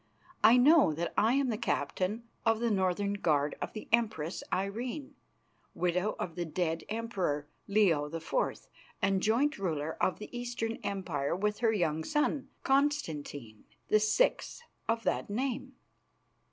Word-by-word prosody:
I 225 +3 +8
know 280 - +6
that 170 +3 -3
I 225 +3 +4
am 275 -2 +2
the 220 -2 -2
captain 185 +10 -1 0.2
of 225 -1 +2
the 235 -1 +1
Northern 195 +1 +1
Guard 150 -7 +1
of - - -4
the 215 - -7
Empress 215 -8 +1
Irene, 235 +9 -3 0.6
widow 180 +4 0
of 170 - -4
the 175 - -3
dead 165 0 -2
emperor, 195 -10 -2 0.2
Leo 180 -8 +3
the 165 +2 -4
Fourth, - - -2 0.3
and 195 -1 +2
joint 240 +6 +2
ruler 160 -5 -2
of 185 - +2
the 210 +3 -9
Eastern 240 -2 -3
Empire 170 -8 -2
with 210 +3 -1
her 230 -2 +3
young 160 -6 0
son, 295 - 0
Constantine, 160 - -1 0.3
the 215 - +5
sixth 215 - +1 0.3
of 230 0 +1
that - - -1
name. 260 +4 -2
210 Hz, 145 wpm, -31 LUFS, 170-235 Hz, 0.6 s, I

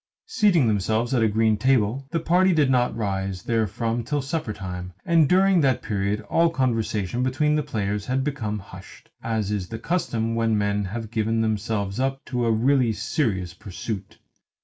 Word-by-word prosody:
Seating 205 - +3
themselves 110 +4 0
at 125 - +2
a 110 - +4
green 110 0 +2
table, 130 +2 +1
the 165 +2 -1
party 180 +3 +3
did 145 -5 +3
not 125 -2 +1
rise 95 -3 -2
therefrom 115 +1 -1
till 145 +5 -1
supper 135 -4 -3
time; 90 -3 -6
and 165 -4 +4
during 190 -1 +4
that 130 -3 +1
period 100 0 -1
all 165 +11 +2
conversation 115 - -1
between 130 +4 +1
the 150 - +2
players 105 -5 -3
became 130 -5 -1
hushed, 95 -1 -13
as 110 -3 -2
is 100 -3 -2
the 115 - -6
custom 115 -6 -1
when 115 -1 +1
men 100 0 0
have 110 +3 -5
given 115 0 0
themselves 105 -1 -1
up 135 +1 -1
to 125 -2 -1
a - - +3
really 125 +2 +3
serious 100 - -1
pursuit. 105 +1 -7
115 Hz, 170 wpm, -24 LUFS, 105-135 Hz, -, a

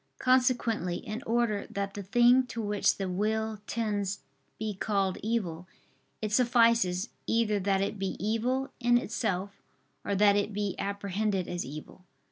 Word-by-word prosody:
Consequently 245 -8 +2
in 220 +2 -5
order 230 -3 +1
that 200 0 -3
the 205 - -5
thing 240 +6 +4
to 235 - -6
which 205 -2 +1
the 195 - -2
will 215 +3 -1
tends 205 -4 -2 0.4
be 215 -1 -3
called 195 -1 -1
evil, 185 -7 -2 0.6
it 215 - -1
suffices, 230 -5 +3 0.2
either 225 -2 +2
that 195 0 +1
it 200 +1 -2
be 195 -1 -2
evil 240 +6 -1
in 240 -1 +4
itself, 200 -4 -2 0.4
or 200 - -1
that 200 0 +5
it 205 +1 0
be 205 -2 -1
apprehended 200 -1 -1
as 175 0 -3
evil. 155 +6 -9
210 Hz, 145 wpm, -29 LUFS, 195-230 Hz, 0.6 s, that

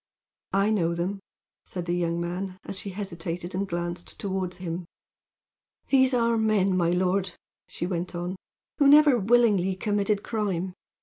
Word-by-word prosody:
"I 200 +2 +3
know 170 -5 +1
them," 185 +4 -2 0.4
said 180 -2 -5
the 175 - -1
young 170 -1 0
man, 180 +2 -4
as 190 - -6
she 200 - -6
hesitated 175 -2 -5
and 195 +2 -1
glanced 175 0 -4
toward 190 -2 -2
him. 175 -1 -5 1.0
"They 260 -1 +5
are 235 -2 +2
men, 205 -4 +2
my 175 -2 +2
lord," 180 +1 +1 0.3
she - - -4
went 180 0 -3
on, 175 +2 -3 0.4
"who 285 - +6
never 290 -3 +7
willingly 205 -4 +3
committed 205 +1 0
crime. 190 -5 -2
185 Hz, 145 wpm, -26 LUFS, 175-210 Hz, 1.0 s, never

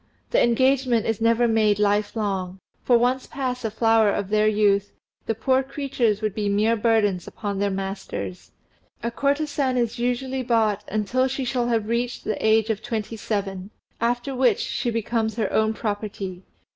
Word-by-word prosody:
The - - +4
engagement 255 -1 +2
is 225 -1 -1
never 230 +1 +3
made 215 -2 +3
life 205 +1 +1
long, 195 -4 -2 0.2
for 245 - +4
once 250 +2 +1
past 255 -2 -3
the 225 - -2
flower 225 0 +3
of 200 -1 -2
their 215 0 +3
youth 205 -1 +2 0.4
the 225 - 0
poor 260 +4 +2
creatures 265 -6 -1
would 215 -2 0
be 205 -1 -1
mere 215 +3 +2
burthens 210 -5 +1
upon 200 -2 -4
their 200 0 +1
masters; 190 - -5 0.5
a 235 - -1
courtesan 280 0 0
is 235 -1 -1
usually 255 +2 -1
bought 220 -4 +1
until 215 +5 0
she 265 0 -3
shall 245 -1 0
have 225 -3 0
reached 235 +1 -2
the 215 - -3
age 220 0 +3
of 215 -1 -3
twenty 225 0 -4
seven, 195 -3 -3 0.3
after 240 +3 -1
which 250 -4 +3
she 240 - -2
becomes 225 -1 -1
her 220 -4 -1
own 220 0 +3
property. 205 -4 -4
225 Hz, 170 wpm, -24 LUFS, 205-245 Hz, 0.5 s, The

